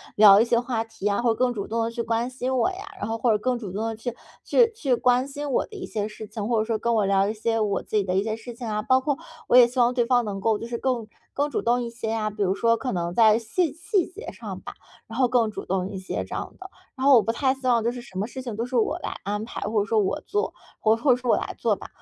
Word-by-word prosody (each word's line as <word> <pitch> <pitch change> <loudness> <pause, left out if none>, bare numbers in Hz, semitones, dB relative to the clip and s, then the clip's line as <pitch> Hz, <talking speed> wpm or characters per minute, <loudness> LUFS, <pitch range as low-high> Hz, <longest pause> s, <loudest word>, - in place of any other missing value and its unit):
聊 205 -1 +8
一 225 - +4
些 235 0 +2
话 240 -2 -2
题 225 -2 -10
呀， 205 +3 +2
或 240 - +2
者 - - -1
更 250 +2 +2
主 200 -4 -4
动 230 +1 -1
地 230 - -2
去 235 - -3
关 230 +1 -1
心 255 0 -2
我 260 +8 +2
呀， 375 - -7 0.2
然 - - -3
后 225 - -1
或 230 +1 +2
者 215 - +3
更 250 +3 0
主 210 -6 -7
动 215 +4 -2
地 225 - -3
去 235 +2 -5 0.3
去 460 -2 +4
去 285 - 0
关 250 +2 +2
心 285 +1 -5
我 - - +1
的 425 - -13
一 375 - -5
些 210 -2 -3
事 215 0 -9
情， 210 -1 -5
或 235 -2 +2
者 - - +2
说 225 -1 0
跟 235 +1 0
我 215 -3 +2
聊 195 0 +3
一 215 - -1
些 225 +1 -1
我 205 -3 0
自 215 - -2
己 205 - +2
的 185 -1 -2
一 195 - +2
些 215 0 -2
事 230 +2 -9
情 235 0 -7
啊， 210 -1 -1
包 260 +3 +3
括 280 +1 -1 0.3
我 245 - +6
也 250 - +10
希 250 +2 -4
望 240 0 +4
对 245 -2 +1
方 245 0 +3
能 205 -3 -4
够 220 +2 +1
就 230 - -6
是 235 0 -3
更 240 -3 -1 0.3
更 290 +1 0
主 285 - -2
动 240 +1 +2
一 235 - -4
些 230 -1 -5
呀。 220 -1 -1
比 210 0 -7
如 190 -1 +2
说 230 +1 +3
可 255 +1 -3
能 175 -1 -2
在 220 +1 +6
细 280 +7 -1
细 350 +3 0
节 415 +5 -9
上 - - -7
吧， - - -8 0.3
然 225 - -8
后 255 - +5
更 240 -2 +2
主 - - -7
动 190 0 -1
一 200 - -6
些 185 - -4
这 - - -9
样 - - -5
的。 380 0 -9 0.3
然 265 -1 -3
后 280 - +8
我 225 - +6
不 225 - 0
太 260 +3 +1
希 265 -1 -12
望 235 -2 +3
就 235 - +1
是 245 0 -7
什 195 -6 -11
么 205 - -1
事 260 +2 -7
情 235 -4 -5
都 230 +3 -2
是 255 - -5
我 230 - +2
来 - - -5
安 210 +2 -2
排， 235 - -7
或 210 +1 0
者 - - -1
说 220 +1 +2
我 210 +9 0
做， 415 0 -1 0.3
或 220 0 +4
或 255 +4 +2
者 245 - +4
说 250 -1 0
我 - - +4
来 - - -4
做 - - +1
吧。 - - -10
230 Hz, 340 characters per minute, -25 LUFS, 215-250 Hz, 0.3 s, 也